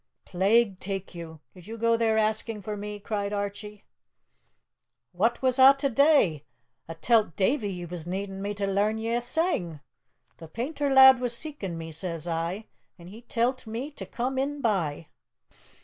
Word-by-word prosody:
"Plague 195 +2 +2
take 195 0 -5
you! 160 -3 -9
did 180 0 -15
you 225 +1 -7
go 230 +1 +2
there 225 -1 +1
asking 215 0 -1
for 210 +2 -4
me?" 210 0 -6
cried 205 -1 -3
Archie. 205 0 -5 1.3
"What 230 +8 0
was 260 0 +2
a 270 +1 +9
to 275 0 -1
dae? 260 - +3 0.4
A 165 - -7
tell't 215 0 +2
Davie 210 +1 0
ye 175 -2 -6
was 170 -1 -8
needin' 195 +1 -4
me 205 +1 -3
to 200 0 -2
lairn 200 +3 +1
ye 225 +1 -2
a 240 - +1
sang! 240 - -1 0.6
'The 165 - -11
painter 280 - -3
lad 265 -1 +8
was 245 -2 -2
seekin' 235 - -6
me,' 165 0 -7
says 165 0 -5
I, 170 +5 -3 0.3
'an' 170 -1 -13
he 215 +4 -11
tell't 240 +1 -1
me 240 +7 -5
to - - -9
come 260 +2 -2
in 285 +2 -2
by.'" 175 - -1
210 Hz, 170 wpm, -27 LUFS, 185-240 Hz, 1.3 s, a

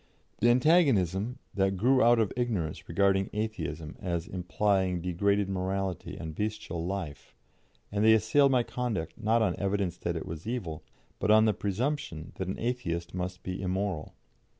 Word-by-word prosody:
The 120 - +4
antagonism 125 - +3 0.2
that 95 -1 +1
grew 130 +6 +4
out 120 +1 +6
of 110 -3 +1
ignorance 110 -11 -2
regarded 95 +2 +2
Atheism 85 -8 -4
as 85 -3 -2
implying 95 0 0
degraded 100 +3 +1
morality 95 -1 -3
and 80 -2 -6
bestial 100 -4 -3
life, 85 -7 -5 0.6
and 100 +1 0
they 110 0 +7
assailed 125 +6 +4
my 125 -2 +3
conduct 115 -8 -3
not 115 0 +2
on 95 -5 +1
evidence 95 -3 -1
that 85 -1 -2
it 80 - -4
was 80 +4 -7
evil, 95 -11 -4 0.4
but 105 - -1
on 110 +1 +7
the 110 - +3
presumption 100 - -2
that 95 - -3
an 95 - -3
Atheist 90 -9 -2
must 90 0 -4
be 90 +1 -4
immoral. 95 -3 -2
100 Hz, 155 wpm, -29 LUFS, 90-110 Hz, 0.6 s, they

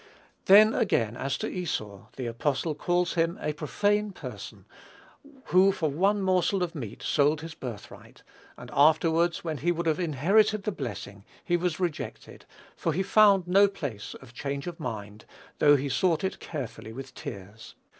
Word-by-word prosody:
Then, 215 +3 +7
again, 120 - +1
as 135 +2 -2
to - - -3
Esau, 110 - -4
the 130 - -5
apostle 135 +6 -1
calls 175 +3 0
him 165 +2 0
"a 150 - -2
profane 205 +7 0
person, - - -9 0.9
who 190 +2 +6
for 165 -5 -1
one 195 +7 +1
morsel 185 0 +2
of 170 - -3
meat 120 -9 -7
sold 150 +1 +2
his 160 0 -7
birthright," 120 -8 -10 0.3
and - - -11
"afterwards, 160 +3 +3
when 160 -4 -3
he 175 +6 +1
would 170 0 -2
have 160 0 +1
inherited 195 - +2
the 210 - -1
blessing, 105 - -7 0.2
he 175 - +1
was 175 -2 -1
rejected; 175 -5 -5 0.3
for 165 - -1
he 190 +5 0
found 200 -2 +5
no 195 +3 +5
place 140 - -6
of 130 -2 -14
change 140 +2 -4
of 175 -2 -7
mind, 105 -1 -6 0.3
though 145 -1 +6
he 140 0 -1
sought 165 +4 +1
it 190 - -2
carefully 125 -7 -7
with 130 +3 -9
tears." 100 +3 -9
160 Hz, 165 wpm, -27 LUFS, 135-185 Hz, 0.9 s, Then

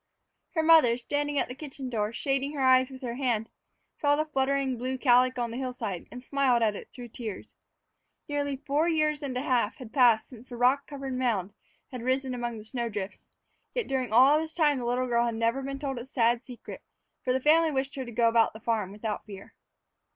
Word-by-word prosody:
Her 320 - +2
mother, 315 -8 +6
standing 290 +3 -2
at - - +1
the 250 - -6
kitchen 270 -1 -7
door, 215 -3 -1
shading 275 +3 -1
her 290 - -5
eyes 260 0 +5
with 260 0 -11
her 240 -2 -3
hand, 240 -4 -1 0.5
saw 290 -1 +2
the 305 +1 0
fluttering 270 -2 0
blue 255 +2 -3
calico 255 -1 +3
on 235 - -3
the 240 - -5
hillside 245 -8 -4
and 250 0 -9
smiled 260 -4 +2
at 210 -2 +2
it - - -9
through 245 -1 -9
tears. 220 -4 -7 0.7
Nearly 285 -1 -1
four 290 +3 0
years 305 -2 +1
and 265 -3 -3
a 255 - -2
half 245 -5 +1
had 245 -4 -11
passed 240 -5 +4
since 250 0 -13
the 240 - -7
rock 255 +4 +3
covered 275 -2 -6
mound 225 -7 -1 0.4
had 250 -2 -6
risen 260 +1 0
among 240 -2 -3
the 215 - -9
snow 235 +1 -3
drifts, 205 -2 -6 0.5
yet 485 -3 0
during 260 -4 -1
all 265 +6 +6
this 320 0 -6
time 295 -5 +3
the 245 - -4
little 250 +2 0
girl 235 -1 +2
had 230 - -2
never 230 +4 0
been 275 0 -4
told 275 -3 -4
its 245 +3 -9
sad 240 -2 +2
secret, 245 -3 -9 0.4
for 255 - 0
the 260 - +2
family 320 +4 +4
wished 270 -1 -2
her 265 - -4
to 240 - -8
go 235 0 +3
about 230 0 +3
the 220 - -10
farm 220 -4 -1
without 210 +1 -4
fear. 195 -2 -11
255 Hz, 215 wpm, -28 LUFS, 235-275 Hz, 0.7 s, mother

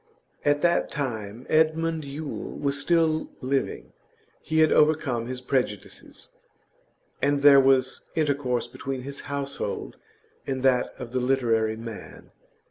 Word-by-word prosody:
At 145 0 +2
that 175 0 +2
time 115 -4 -4
Edmund 160 0 +1
Yule 145 +2 -6
was 140 -1 0
still 160 0 +2
living; 135 +1 -2 0.5
he 160 0 +1
had 155 - +5
overcome 145 -6 +2
his 125 0 -5
prejudices, 125 -6 -3 0.9
and 140 0 +1
there 140 -1 +9
was 130 -1 +2
intercourse 140 -6 0
between 130 +1 -6
his 140 +1 -6
household 140 -6 -4 0.5
and 130 -1 -2
that 130 -2 +2
of 125 -3 -8
the 130 - 0
literary 115 -4 +1
man. 115 -2 -9
135 Hz, 125 wpm, -26 LUFS, 125-145 Hz, 0.9 s, there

